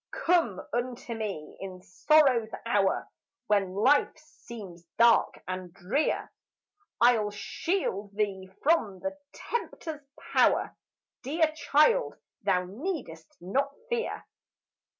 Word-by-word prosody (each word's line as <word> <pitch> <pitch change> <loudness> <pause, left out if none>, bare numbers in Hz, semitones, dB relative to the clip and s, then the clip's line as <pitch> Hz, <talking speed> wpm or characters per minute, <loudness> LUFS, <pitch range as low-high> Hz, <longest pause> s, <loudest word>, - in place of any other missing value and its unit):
"Come 330 - +3
unto 245 0 -3
me 205 -9 -5
in 185 -2 -8
sorrow's 260 - +3 0.2
hour 205 -4 +1 0.4
When 200 -4 +1
life 265 +11 +3
seems 220 - -11
dark 235 0 +4
and 185 -1 -5
drear; 195 - -1 0.7
I'll 235 -3 +4
shield 205 - -2
thee 195 -3 -2
from 230 - +2
the 290 0 -3 0.2
tempter's 325 -9 -5 0.3
power; - - +3 0.5
Dear 310 +4 +1
child, 315 - +3 0.3
thou 180 0 +2
need'st 205 - -5
not 275 +10 -1
fear. 475 0 -2
230 Hz, 100 wpm, -28 LUFS, 195-300 Hz, 0.7 s, dark